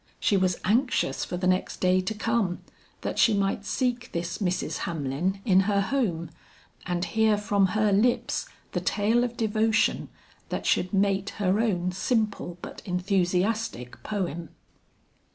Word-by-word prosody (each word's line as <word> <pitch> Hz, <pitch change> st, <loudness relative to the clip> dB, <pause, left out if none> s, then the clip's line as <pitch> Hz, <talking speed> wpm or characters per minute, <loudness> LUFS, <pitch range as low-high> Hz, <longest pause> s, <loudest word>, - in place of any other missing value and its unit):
She 205 Hz, -, +2 dB
was 185 Hz, -2 st, +2 dB
anxious 225 Hz, -, +1 dB
for 180 Hz, -, -4 dB
the 180 Hz, -, -2 dB
next 185 Hz, 0 st, 0 dB
day 185 Hz, 0 st, +3 dB
to 185 Hz, +4 st, -3 dB
come, 220 Hz, -4 st, 0 dB, 0.4 s
that -, -, -3 dB
she 225 Hz, -, +5 dB
might 200 Hz, +1 st, 0 dB
seek 245 Hz, 0 st, -1 dB
this 170 Hz, +2 st, -3 dB
Mrs. 185 Hz, -3 st, -1 dB
Hamlin 165 Hz, +4 st, -2 dB
in 190 Hz, -5 st, +5 dB
her 200 Hz, -1 st, +3 dB
home, 195 Hz, -, -1 dB, 0.6 s
and 175 Hz, 0 st, -1 dB
hear 215 Hz, +4 st, +2 dB
from 205 Hz, -1 st, +2 dB
her 215 Hz, -2 st, +3 dB
lips 235 Hz, +5 st, +1 dB, 0.2 s
the -, -, -2 dB
tale 220 Hz, +4 st, +2 dB
of 240 Hz, -1 st, -3 dB
devotion 220 Hz, 0 st, +1 dB, 0.4 s
that -, -, -3 dB
should 180 Hz, -, +2 dB
mate 195 Hz, 0 st, +1 dB
her 200 Hz, 0 st, +1 dB
own 185 Hz, -6 st, +1 dB
simple 205 Hz, -2 st, -1 dB
but -, -, -8 dB
enthusiastic 180 Hz, -, -1 dB
poem. 175 Hz, -6 st, -3 dB
195 Hz, 145 wpm, -27 LUFS, 180-220 Hz, 0.6 s, she